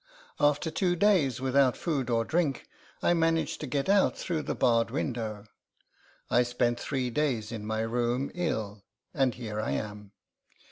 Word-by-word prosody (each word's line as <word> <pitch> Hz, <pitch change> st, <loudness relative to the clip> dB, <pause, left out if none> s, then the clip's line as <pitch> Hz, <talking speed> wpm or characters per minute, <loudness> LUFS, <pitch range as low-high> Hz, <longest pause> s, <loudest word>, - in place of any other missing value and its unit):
After 145 Hz, +2 st, +2 dB
two 175 Hz, +2 st, +1 dB
days 170 Hz, -, +3 dB
without 130 Hz, 0 st, +3 dB
food 140 Hz, -8 st, -1 dB
or 115 Hz, -1 st, +1 dB
drink, 155 Hz, -3 st, 0 dB, 0.4 s
I -, -, +4 dB
managed 165 Hz, -1 st, +1 dB
to 150 Hz, -, -4 dB
get 135 Hz, +2 st, -1 dB
out 195 Hz, 0 st, +3 dB
through 165 Hz, -4 st, -2 dB
the -, -, -3 dB
barred 115 Hz, -2 st, +3 dB
window. 115 Hz, -6 st, -3 dB, 0.8 s
I 120 Hz, -1 st, +3 dB
spent 120 Hz, 0 st, 0 dB
three 130 Hz, -3 st, -2 dB
days 120 Hz, -6 st, -1 dB
in 110 Hz, -2 st, -5 dB
my 110 Hz, 0 st, -1 dB
room, 120 Hz, +3 st, -1 dB
ill, 110 Hz, -, -2 dB, 0.3 s
and 135 Hz, -4 st, +1 dB
here 110 Hz, -3 st, -4 dB
I -, -, -2 dB
am. 105 Hz, -1 st, -5 dB
125 Hz, 155 wpm, -29 LUFS, 115-150 Hz, 0.8 s, I